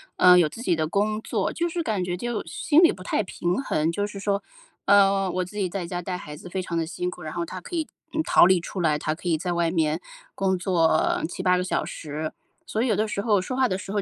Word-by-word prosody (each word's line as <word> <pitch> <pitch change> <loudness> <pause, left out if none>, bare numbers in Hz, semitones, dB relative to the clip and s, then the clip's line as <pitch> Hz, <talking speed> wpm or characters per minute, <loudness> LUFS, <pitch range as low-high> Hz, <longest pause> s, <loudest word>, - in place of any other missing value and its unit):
呃， 180 0 +7
有 155 -3 +3
自 235 - -9
己 180 - +2
的 155 -1 -1
工 215 +4 0
作， 210 -4 -1
就 345 0 -1
是 340 0 -2
感 210 -9 -1
觉 180 0 -2
就 240 +2 -3
心 345 -3 +3
里 340 - +7
不 185 - -9
太 215 - 0
平 180 +2 -2
衡， 160 - 0
就 205 +4 -1
是 205 -1 -8
说， 200 0 0 0.4
呃， 195 -1 +4
我 185 0 -1
自 195 - -13
己 195 -3 -1
在 180 -1 -4
家 175 0 -4
带 180 +1 -4
孩 150 -3 -8
子 175 +4 -11
非 190 - -3
常 170 - -4
地 165 -1 0
辛 180 +1 -3
苦， 180 - -11
然 155 -1 -6
后 170 -1 -2
他 185 +2 -7
可 350 - -7
以， 320 -2 -1 0.3
嗯， 315 0 0
逃 - - +6
离 185 -1 +4
出 180 +2 -5
来， 155 -3 +2
他 155 +1 -1
可 175 +2 -5
以 160 - +2
在 175 +2 -2
外 170 -1 +1
面 160 0 0 0.3
工 190 -1 0
作 170 -3 +2
7-8 180 +1 +1
个 180 - 0
小 185 - -1
时， 155 0 -5 0.3
所 220 - -2
以 255 - +1
有 215 - +2
的 215 +2 +1
时 200 - -2
候 210 -3 +3
说 185 +7 -4
话 260 -1 +3
的 185 - -1
时 195 - -7
候 205 0 0
185 Hz, 285 characters per minute, -25 LUFS, 170-210 Hz, 0.4 s, 呃